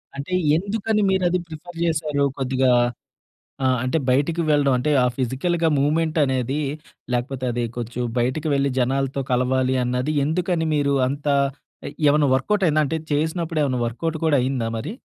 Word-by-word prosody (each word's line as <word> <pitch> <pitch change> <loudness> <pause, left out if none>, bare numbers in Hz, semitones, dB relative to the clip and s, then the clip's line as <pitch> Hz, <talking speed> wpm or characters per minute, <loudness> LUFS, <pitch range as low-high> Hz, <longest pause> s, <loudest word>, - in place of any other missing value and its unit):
అంటే, 140 +6 -5 0.2
ఎందుకని 210 +3 -1
మీరు 190 -1 +1
అది 180 +1 +1
ప్రిఫర్ 165 +2 -10
చేసారు? 155 -3 0 0.2
కొద్దిగా 130 -1 +2 0.9
ఆ! - - +4 0.2
అంటే 130 +5 0
బయటకి 145 +6 +1
వెళ్ళడం 145 -2 +3
అంటే, 150 +5 0
ఆ - - +3
ఫిజికల్‌గా 160 +7 0
మూవ్‌మెంట్ 155 +3 +1
అనేది 130 +1 -1 0.5
లేకపోతే, 130 +2 -2
అది 120 0 -2
కొంచెం 120 +1 -4 0.2
బయటికి 130 +6 -1
వెళ్ళి 140 0 +1
జనాలతో 135 +2 0
కలవాలి 130 +1 +1
అన్నది. 125 +4 -1
ఎందుకని 170 +1 0
మీరు 140 -1 +1
అంత 145 +3 -4 0.6
ఎ - - -3 0.2
ఏమన్నా 145 0 +4
వర్క్‌అవుట్ 200 +9 +1
అయిందా? 155 0 +3
అంటే 160 +3 -2
చేసినప్పుడు 160 +2 -1
ఏమన్నా 130 -3 0
వర్క్‌అవుట్ 160 +7 -3
కూడా 155 -2 +3
అయిందా 125 -3 -1
మరి? 110 - -5
145 Hz, 150 wpm, -22 LUFS, 130-160 Hz, 0.9 s, ఆ